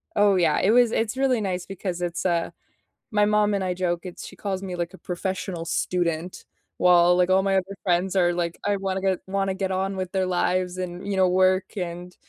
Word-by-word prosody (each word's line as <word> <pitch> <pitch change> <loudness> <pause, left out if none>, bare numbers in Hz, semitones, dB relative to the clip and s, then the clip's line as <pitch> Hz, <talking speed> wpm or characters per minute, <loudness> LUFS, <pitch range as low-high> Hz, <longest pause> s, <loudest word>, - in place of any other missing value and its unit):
Oh, 205 -1 +4
yeah. 170 -4 +2
It 200 - +3
was 240 -1 +5
it's 225 +3 -1
really 260 -4 +2
nice 185 -2 -2
because 185 -2 -5
it's, 175 +1 -3
uh, 170 -2 0 0.6
my 210 -1 +3
mom 210 0 +2
and 195 -1 0
I 180 -1 -1
joke, 175 -1 -1
it's 180 - -8
she - - -11
calls 195 -1 -4
me 185 -2 -4
like, 175 +1 -3
a - - -11
professional 180 -1 -4
student 175 0 -2 0.3
while, 175 0 +5
like, 180 0 +2
all 190 +1 +4
my 195 -1 +1
other 190 +1 -1
friends 180 +1 +1
are 175 -2 +3
like, 170 -1 -2
I 205 -1 +1
wanna 190 -1 -2
get 190 -2 +1
wanna 195 0 -1
get 190 0 -2
on 190 +1 -1
with 185 -1 -4
their 190 -1 0
lives 180 0 0
and 180 +1 -5
you 195 -1 -1
know, 185 -1 +4
work 185 +1 +2
and 175 0 -5
185 Hz, 220 wpm, -24 LUFS, 180-195 Hz, 0.6 s, was